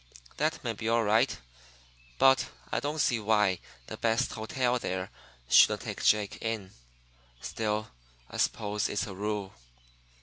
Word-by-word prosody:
That 155 0 -1
may 115 -3 -1
be 110 +1 -3
all 115 0 +3
right; 115 +4 +2 0.8
but 135 0 +5 0.2
I - - +1
don't 150 +2 -3
see 125 -5 +2
why 105 -3 +2 0.3
the - - -7
best 115 +3 +1
hotel 125 +2 0
there 95 -3 -3 0.4
shouldn't - - +6
take - - -6
Jake 105 -1 +2
in. 110 -4 -3 0.7
Still, 110 - -2 0.4
I - - -8
suppose 105 0 0
it's 105 - -1
a 100 - -7
rule. 100 0 -3
110 Hz, 140 wpm, -29 LUFS, 105-120 Hz, 0.8 s, shouldn't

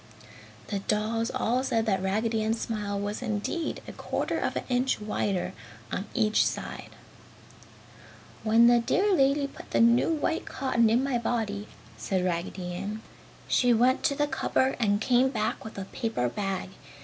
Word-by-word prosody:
The 200 - -1
dolls 220 +3 0
all 255 0 0
said 225 -4 +1
that 195 -4 +1
Raggedy 220 +4 0
Ann's 220 +1 0
smile 205 -3 -2
was 205 +3 -3
indeed 230 +8 -2
a - - -6
quarter - - -2
of - - -1
an - - -2
inch 255 +1 +1
wider 205 -3 -2 0.4
on 195 - -3
each 215 0 +3
side. - - -4 1.5
"When 225 +2 +5
the 240 0 +6
dear 390 - +2
lady 280 -2 +3
put 280 - -10
the - - +1
new 235 +6 +5
white 320 +1 -1
cotton 235 -4 +1
in 235 +4 +3
my 270 -3 0
body," 215 -3 -2 0.3
said 180 +11 -1
Raggedy 180 +1 -3
Ann 205 +4 -5 0.4
"she 245 -2 +4
went 250 +3 +3
to 280 - +2
the 295 - +2
cupboard 265 -1 0
and 205 -3 +2
came 250 +3 +3
back - - -2
with 220 - -9
a 195 - -4
paper 210 - -2
bag. 195 - -3
225 Hz, 160 wpm, -28 LUFS, 205-250 Hz, 1.5 s, the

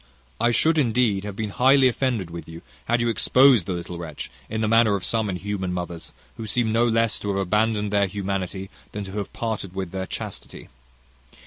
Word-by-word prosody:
I 120 +1 +3
should 155 +7 +3
indeed 115 -6 +2
have 105 -2 -5
been 105 0 -3
highly 130 +4 +5
offended 120 -8 -1
with 85 -1 -8
you 80 +1 -10 0.2
had 120 +1 +1
you 120 - +1
exposed 125 -2 +5
the 95 - -1
little 85 0 -6
wretch 80 -4 -7 0.2
in 110 +1 -2
the 110 - +1
manner 115 -1 +4
of 100 - -3
some 110 -2 0
inhuman 95 0 -3
mothers, 85 -2 -5 0.3
who 110 - -6
seem 115 +1 +1
no 115 +2 +3
less 115 -1 +2
to 105 - -4
have 100 - 0
abandoned 105 +2 +1
their 100 -1 +3
humanity, 95 0 -4 0.2
than 105 - -4
to 95 - -8
have 100 0 -4
parted 110 -5 -4
with 95 -3 -4
their 95 -1 -4
chastity. - - -7
105 Hz, 200 wpm, -24 LUFS, 95-115 Hz, 0.3 s, highly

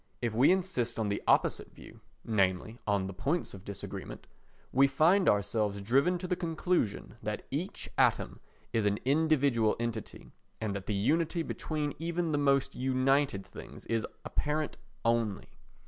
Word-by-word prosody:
If 120 -3 -1
we 125 +8 +5
insist 175 -11 0
on 110 -2 0
the 100 - -1
opposite - - +2
view, - - -14 0.2
namely, 105 +1 0
on 100 -2 +2
the 95 - -5
points 150 - -1
of 95 -2 -10
disagreement, 100 -2 -7 0.5
we 135 +1 +5
find 165 +8 +4
ourselves 105 0 +1
driven 135 - +2
to 180 +1 -5
the 180 - +1
conclusion 170 - -1
that - - -4
each - - -3
atom - - +2 0.3
is 110 -2 +2
an 100 0 +1
individual 140 -6 +3
entity, 115 -2 -5 0.3
and 105 -2 -2
that 100 -1 -6
the 105 - 0
unity 165 - +1
between 150 -2 -3
even 170 0 -1
the 145 - +1
most 140 -1 +2
united 130 -4 +1
things - - -11
is 115 -1 -1 0.2
apparent 150 0 -1 0.3
only. 115 -3 0
130 Hz, 150 wpm, -31 LUFS, 105-155 Hz, 0.5 s, we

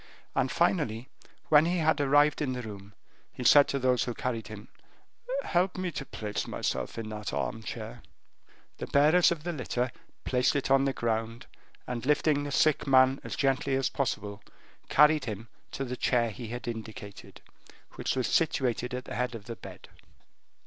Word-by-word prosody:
And - - 0
finally, 115 +4 0 0.4
when 150 0 +6
he 180 +1 0
had 160 -2 +2
arrived 145 +2 +4
in 135 -3 0
the 125 0 -5
room, 100 -2 -10 0.4
he 125 - -7
said 145 +3 +7
to 140 - -1
those 130 -2 +2
who 120 - -4
carried 115 -3 -3
him: 110 0 -10 0.8
"Help 180 +1 0
me 185 -1 -2
to 135 -3 -6
place 105 -1 -4
myself - - -3
in 110 -1 -5
that 105 -1 -5
armchair." 110 +1 -4 0.8
The - - -4
bearers 155 +5 +5
of 160 -3 -3
the 175 0 -3
litter 125 -3 -2 0.3
placed 125 +2 +2
it 140 -1 -1
on 135 0 +5
the 135 - +2
ground, 115 0 -2 0.4
and 120 -2 -4
lifting 145 +1 +2
the 145 - -4
sick 150 +2 +2
man 130 0 +5
up - - -22
as - - -4
gently 135 0 +1
as 135 0 +1
possible, 105 -6 -3 0.5
carried 150 0 +5
him 110 0 -6 0.2
to 135 - -3
the 125 0 -4
chair 120 -3 +1
he 115 +2 -8
had 120 +2 -6
indicated, 110 -2 -8 0.5
which - - -2
was 130 -2 0
situated 125 -5 0
at 125 - -6
the - - -7
head 125 -1 -2
of 105 -3 -9
the 115 0 -6
bed. - - -12
125 Hz, 175 wpm, -29 LUFS, 115-145 Hz, 0.8 s, said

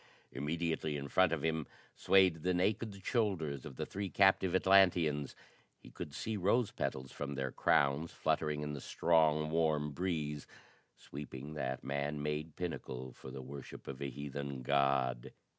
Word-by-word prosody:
Immediately 80 0 -1
in 70 0 -6
front 95 +1 +4
of 80 -3 -1
him 80 -2 0 0.3
swayed 95 -4 +4
the 90 +2 +1
naked 100 +2 -1
shoulders 85 - 0
of 65 - -10
the - - -3
three 100 0 -4
captive 95 -2 +4
Atlanteans; 90 -7 +4 0.4
he - - -15
could 75 - -7
see 110 -1 -2
rose 100 +5 +2
petals 65 0 -3
from 70 -1 -5
their 65 -1 -2
crowns 70 +6 +2
fluttering 75 -1 0
in 75 0 -3
the 70 - -6
strong 75 -1 +2
warm 80 -2 +1
breeze 75 -3 -2 0.5
sweeping 70 +1 -8
that 65 -4 -3
man 70 +2 -2
made 75 +1 -3
pinnacle 65 -7 -5
for 65 - -10
the 65 0 -7
worship 70 0 -9
of 70 0 -6
a 70 - -2
heathen 70 0 -5
god. 70 -3 +1
75 Hz, 155 wpm, -34 LUFS, 70-90 Hz, 0.5 s, front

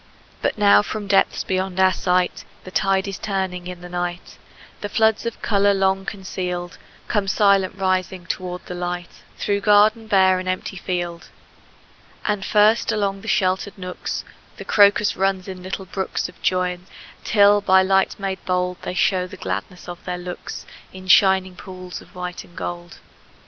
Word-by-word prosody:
But - - 0
now 100 0 +6
from 210 - -5
depths 195 -1 +2
beyond 190 0 -2
our 190 0 +5
sight, 180 0 0 0.2
The 185 - -10
tide 195 0 +1
is 195 -2 -5
turning 190 -3 -3
in 180 -1 -7
the 180 - -8
night, 175 0 -5 0.4
And 205 - -5
floods 220 0 +2
of 230 - -6
color 200 -1 +3
long 190 0 +1
concealed 180 -3 -5 0.3
Come 205 -2 0
silent 195 -1 +3
rising 185 -1 -1
toward 180 0 -5
the - - -6
light, 175 0 -5 0.2
Through 200 0 -1
garden 215 +2 +4
bare 190 -2 +4
and 185 0 -4
empty 185 +1 -3
field. 175 -2 -4 1.0
And 210 -2 0
first, 215 +3 +3
along 200 -2 -1
the - - -11
sheltered 190 +2 0
nooks, 180 -1 -5 0.3
The - - -8
crocus 205 0 +4
runs 190 0 0
in 185 -1 -7
little 190 +1 -5
brooks 190 +1 -3
Of - - -17
joyance, 180 0 -1 0.3
till 205 -1 +5
by 190 -1 +5
light 190 +1 +2
made 195 -1 -4
bold 180 0 -1
They - - -5
show 185 0 +2
the - - -11
gladness 100 - -5
of 175 -1 -8
their 180 -1 -3
looks 180 0 -7 0.3
In 185 0 -11
shining 190 0 +5
pools 185 -1 -9
of - - -19
white 180 -1 -5
and 175 - -20
gold. 175 0 -6
185 Hz, 165 wpm, -22 LUFS, 180-195 Hz, 1.0 s, now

